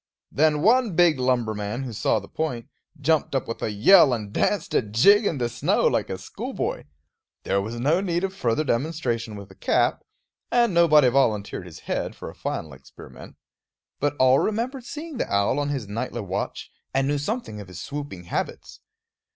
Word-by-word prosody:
Then 150 +1 +2
one 230 -3 +3
big 170 -5 +4
lumberman, 120 -2 -1
who 125 -3 -6
saw 110 - +1
the - - -6
point, 125 -8 -3 0.3
jumped 150 -1 +1
up 135 - -1
with 115 - -5
a - - -1
yell 135 - +6
and 105 -3 -4
danced 205 - 0
a - - +4
jig 165 - +4
in 155 - -1
the 120 -2 0
snow, 120 - 0
like - - +1
a - - -3
schoolboy. - - -5 0.6
There 100 - +1
was 115 +4 -5
no 155 +9 +2
need 175 -2 -1
of 190 0 -2
further 125 -2 0
demonstration 120 -5 -2
with 100 -1 -10
a - - -15
cap; - - +1 0.5
and 235 -4 +3
nobody 155 -5 +6
volunteered 105 -8 0
his 80 - -12
head - - -3
for - - -8
a - - -19
final 80 -3 -4
experiment; 65 0 -13 0.6
but 145 0 0
all 130 +1 +5
remembered 240 +4 -2
seeing 305 +1 -7
the - - -3
owl 100 +7 +2
on 145 0 -1
his 135 -7 -3
nightly 115 +3 -4
watch, 95 -1 -4 0.2
and 135 0 +2
knew 145 0 0
something 145 - -4
of 100 - -11
his 90 -2 -9
swooping 145 -11 -6
habits. 85 - -5
135 Hz, 185 wpm, -24 LUFS, 110-170 Hz, 0.6 s, yell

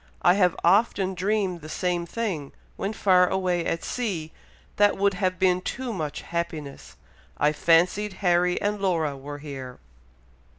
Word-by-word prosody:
I 175 - +6
have 180 -3 +3
often 190 +1 +3
dreamed 190 -1 -1
the 155 - -9
same 175 +1 -1
thing, 180 -11 -3 0.2
when 195 - -3
far 185 -4 +4
away 180 -2 0
at 165 - -2
sea, 185 -11 -3 0.5
that 205 0 +4
would 200 0 +2
have 185 -1 -1
been 185 -1 +2
too 245 +4 -4
much 155 -6 -4
happiness! 160 -5 -5 0.4
I 150 - +3
fancied 180 +6 +2
Harry 180 -2 +2
and 205 0 -2
Laura 165 -7 0
were 145 +2 -8
here!" 135 -4 -8
180 Hz, 145 wpm, -25 LUFS, 165-195 Hz, 0.5 s, I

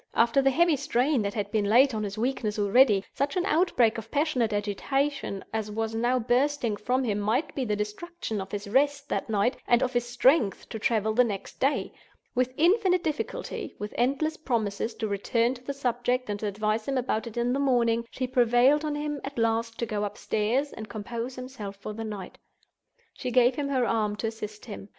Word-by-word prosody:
After 235 +4 +4
the 270 - +4
heavy 330 +4 +3
strain 270 -1 +1
that 200 -1 -3
had 205 -2 -3
been 215 -2 +1
laid 255 +4 +5
on 215 - -2
his 205 0 -4
weakness 225 -3 -1
already, 205 0 +4
such 285 +7 -1
an 360 - +1
outbreak 280 - +2
of 225 0 -10
passionate 280 -6 +1
agitation 210 +3 -1
as 220 -1 -2
was 220 +1 -2
now 240 +3 +1
bursting 250 -1 +1
from 250 +6 0
him 210 -4 0
might 235 +9 0
be 265 - -2
the 210 -2 0
destruction 210 - -4
of 190 - -8
his 205 0 -4
rest 285 +5 +1
that - - -2
night 215 +3 +1
and 240 +1 +4
of 255 - -1
his 240 0 0
strength 245 -3 +2
to 220 - -5
travel 220 -1 +1
the 250 +3 +5
next 205 -5 -5
day. 275 +2 0 0.4
With 255 0 +1
infinite 365 +2 +3
difficulty, 320 +10 -4
with 210 0 -6
endless 280 +6 0
promises 225 -5 -2
to 220 - -2
return 230 +4 +1
to 250 -1 -12
the 280 - -3
subject, 250 -3 -1
and 205 - -3
to 215 - -2
advise 215 +2 -1
him 275 -1 0
about 235 -2 -1
it 230 - -9
in 240 +1 +1
the 275 - 0
morning, 235 -4 +2
she 255 - -3
prevailed 250 +3 +4
on 300 -1 -1
him, 295 -1 -3
at 275 -1 -7
last, 230 0 0
to 235 - -1
go 210 -2 -2
upstairs 215 +6 -1
and 220 -1 -8
compose 235 +3 -5
himself 250 -6 -7
for 200 +2 -7
the 225 +1 -5
night. 210 -4 -7 0.7
She 250 - -4
gave 250 +1 +4
him 280 +1 -3
her 260 -3 +2
arm 215 -3 0
to 225 - -2
assist 215 -1 -8
him. 205 -3 -8
240 Hz, 205 wpm, -27 LUFS, 215-270 Hz, 0.7 s, laid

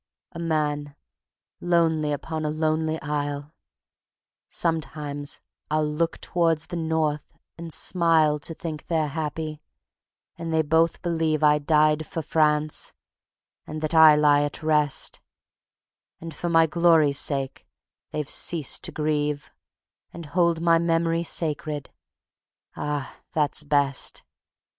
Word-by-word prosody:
A 170 - -8
man 150 -3 -1 0.6
lonely 165 -3 +2
upon 155 +2 -4
a 150 - -1
lonely 155 +1 0
isle, 145 0 -3 1.0
Sometimes 150 -3 -3 0.3
I'll 155 0 +1
look 165 +2 -1
towards 165 -3 0
the 175 - -7
North 160 -2 -1 0.2
and 170 0 -7
smile 160 -4 +2
To 165 +3 -7
think 155 -3 -6
they're 160 -3 0
happy, 155 0 -4 0.8
and 165 -1 -4
they 160 0 +2
both 160 +2 +2
believe 160 -3 0
I 150 0 +5
died 155 +1 +2
for 165 - -4
France, 150 0 +1 0.7
and 155 - -5
that 155 +1 -2
I 160 -2 +8
lie 145 -1 +4
at 145 +2 -3
rest; 150 -2 0 1.0
And 165 0 -8
for 175 - -3
my 165 -1 +5
glory's 160 -3 +3
sake 135 -2 -2 0.4
they've 150 -2 -3
ceased 155 -1 +1
to - - -3
grieve, 150 -1 -1 0.6
And 170 -1 -9
hold 170 +2 +1
my 165 -1 +4
memory 165 0 +1
sacred. 150 -3 -3 0.8
Ah! 145 -2 -4
that's 150 -2 0
best. 145 -2 0
155 Hz, 120 wpm, -25 LUFS, 150-165 Hz, 1.0 s, I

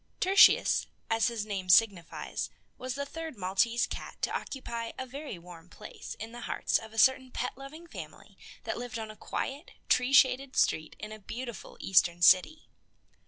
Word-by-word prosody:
Tertius, 385 +2 +5 0.2
as 225 +1 +3
his 230 -3 -3
name 195 -3 -4
signifies, 195 -4 +2 0.3
was 255 0 -5
the 280 0 -3
third 320 -2 -7
Maltese 200 +6 +1
cat - - -8
to - - 0
occupy 235 -4 -5
a 260 - -4
very 275 - -7
warm 170 0 -13
place - - -9
in 225 +1 -7
the 240 +1 -9
hearts - - 0
of 220 -1 -11
a 225 - -12
certain 260 +3 +4
pet 250 0 -4
loving 275 +6 -11
family 340 - -11 0.3
that - - -4
lived 245 0 -5
on 220 -1 -6
a - - -13
quiet, 280 +8 -5 0.2
tree 250 +1 +3
shaded 265 0 +4
street 155 0 +1
in 215 - -8
a 215 - -8
beautiful 235 +1 -8
Eastern 175 -2 +3
city. 185 - +5
235 Hz, 170 wpm, -30 LUFS, 205-265 Hz, 0.3 s, Tertius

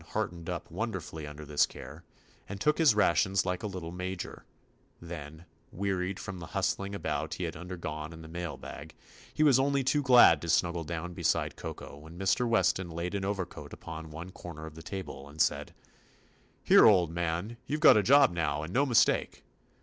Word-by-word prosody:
The - - -18
kitten - - -18
heartened 85 -1 -3
up 90 -1 -5
wonderfully 90 -6 -4
under 75 +1 -9
this 75 0 +2
care, 70 +6 -11 0.5
and 100 0 -6
took 150 +9 +2
his 150 -9 +5
rations 95 -1 +3
like 90 -1 -2
a - - -3
little 90 -4 -6
major; 90 0 -6 0.5
then, 80 -1 -9 0.3
wearied 95 0 -2
from 95 -2 -6
the 80 - -8
hus - - +2
tling 100 0 -6
about 80 -3 -3
he 90 - -5
had 85 -1 -3
undergone 80 -4 -6
in 80 0 -10
the - - -10
mail 85 -3 -5
bag, - - -10 0.4
he 155 - +1
was 140 -4 +5
only 140 0 +2
too 145 +3 +2
glad 125 - +7
to 85 - -5
snuggle 85 +1 +1
down 85 +2 -5
beside - - 0
Koko 70 - -8
when 80 +3 -12
Mr. 95 +6 +1
Weston 95 -5 +2
laid 85 +3 -4
an 100 -1 -2
overcoat 95 -3 -4
upon 80 -1 -8
one 85 +4 -8
corner 85 -3 -9
of 80 - -9
the 80 - -11
table 80 -6 -7
and 75 +2 -14
said: - - +1 0.9
"Here, - - +7
old 90 -6 +4
man, 85 +6 -3
you 150 - -1
've - - -10
got 155 - +8
a 105 - +5
job 140 +5 +6
now, 75 -3 -1
and 80 +4 -7
no 140 +3 +3
mistake. 120 -3 +2
85 Hz, 200 wpm, -30 LUFS, 80-100 Hz, 0.9 s, got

